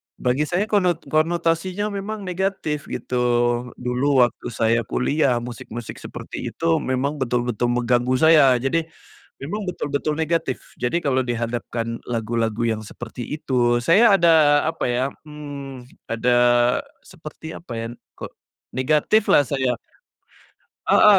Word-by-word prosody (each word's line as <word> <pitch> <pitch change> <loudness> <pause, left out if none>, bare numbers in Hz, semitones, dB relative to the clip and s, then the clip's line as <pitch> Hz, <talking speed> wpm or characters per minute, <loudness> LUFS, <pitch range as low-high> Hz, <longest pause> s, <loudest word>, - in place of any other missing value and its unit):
bagi 125 +4 0
saya 180 +5 +1
konot 180 -4 +2
konotasinya 170 +4 +1
memang 205 +1 -5
negatif, 180 -5 -2
gitu. 125 - -5 0.6
Dulu 125 +2 -2 0.2
waktu 120 - -2
saya 115 +1 +3
kuliah, 135 0 +1
musik-musik 120 -1 -7
seperti - - -8
itu - - -6
memang 135 +3 -2
betul-betul 120 -2 0
mengganggu 125 +1 +1
saya. 150 -5 +7
Jadi, 160 +7 0 0.5
memang 205 +10 -4
betul-betul 145 -2 -2
negatif. 160 -4 0 0.2
Jadi 125 +8 +1
kalau 130 -5 +1
dihadapkan 115 -1 -3
lagu-lagu 115 -1 -2
yang 110 -1 -1
seperti 120 +3 -8 0.2
itu, 120 -3 +1
saya 195 - +5
ada 155 -3 +5
apa 160 - -2
ya, 120 +1 0 0.2
mmm, 140 -4 -9 0.2
ada 115 +2 0 0.8
seperti 160 -2 -10
apa 165 - -10
ya, 115 - -3 0.3
kok, - - -8 0.4
negatif 150 +11 +2
lah 145 - +5
saya. 130 -3 -1 1.1
Heeh, - - +7
135 Hz, 120 wpm, -22 LUFS, 120-165 Hz, 1.1 s, saya